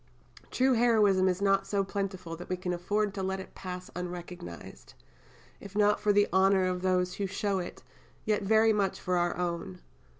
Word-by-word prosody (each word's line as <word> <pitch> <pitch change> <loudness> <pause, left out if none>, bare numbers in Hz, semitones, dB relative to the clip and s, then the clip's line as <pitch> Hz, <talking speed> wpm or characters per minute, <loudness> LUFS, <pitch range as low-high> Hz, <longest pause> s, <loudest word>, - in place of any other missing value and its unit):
True 260 +1 +2
heroism 210 -6 +4
is 185 +2 -1
not 195 0 +2
so 200 -1 +1
plentiful 190 -3 -4
that 175 - -10
we 185 - -1
can 180 0 -3
afford 205 +4 -1
to 195 - -4
let 190 0 -2
it 190 - -10
pass 180 -1 -7
unrecognized 175 - -8 0.6
if 200 0 -11
not 210 0 +3
for 210 - +2
the 205 0 +4
honour 190 0 +4
of 180 -1 -1
those 180 -1 +1
who 200 - -2
show 200 0 -1
it, 175 - -7 0.4
yet 215 -1 +1
very 220 +2 +4
much 200 -2 0
for 180 -1 -1
our 175 0 0
own. 170 - -3
190 Hz, 180 wpm, -29 LUFS, 180-205 Hz, 0.6 s, heroism